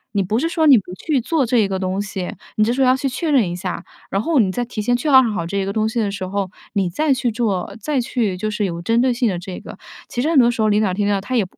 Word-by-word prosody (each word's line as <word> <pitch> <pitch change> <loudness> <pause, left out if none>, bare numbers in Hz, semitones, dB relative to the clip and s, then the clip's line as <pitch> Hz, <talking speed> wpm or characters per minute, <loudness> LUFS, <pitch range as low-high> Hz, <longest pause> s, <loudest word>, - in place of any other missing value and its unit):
你 200 - +3
不 210 +4 -1
是 320 +6 0
说 325 -2 +1
你 275 -4 +8
不 185 -3 -5
去 275 - -1
做 290 +5 0
这 230 -4 +2
个 190 -1 -3
东 185 +1 -2
西， 195 -3 -4 0.2
你 215 - +3
这 225 - +2
时 265 +2 0
候 260 - +4
要 255 - +5
去 270 +1 -2
确 310 +4 -2
认 235 -10 +3
一 175 - -4
下， 180 +1 -5 0.3
然 195 - +1
后 320 +3 0
你 200 -6 +3
在 245 +6 -2
提 235 -2 -7
前 245 +4 +1
确认 260 0 +5
好 210 -7 -1
这 200 - -3
一 195 - 0
个 195 - -3
东 215 0 +1
西 230 +1 -2
的 205 -2 0
时 200 -2 -5
候， 195 0 -2 0.3
你 195 -3 +1
再 285 - 0
去 245 -2 -1
做， 210 -6 -2
再 295 -3 0
去 225 -6 -1
就 215 +3 -2
是 210 0 -2
有 170 -4 -2
针 230 +7 +1
对 255 0 +3
性 240 0 +1
的 185 -5 -1
这 180 0 -7
个。 - - -10 0.3
其 245 - -3
实 305 - 0
很 330 - +2
多 240 -2 +6
时 230 - -3
候 215 - +3
领 210 - +3
导 190 - 0
听 205 +2 0
到， 200 -1 +1
他 225 +6 -4
也 225 - +3
215 Hz, 340 characters per minute, -20 LUFS, 195-255 Hz, 0.3 s, 你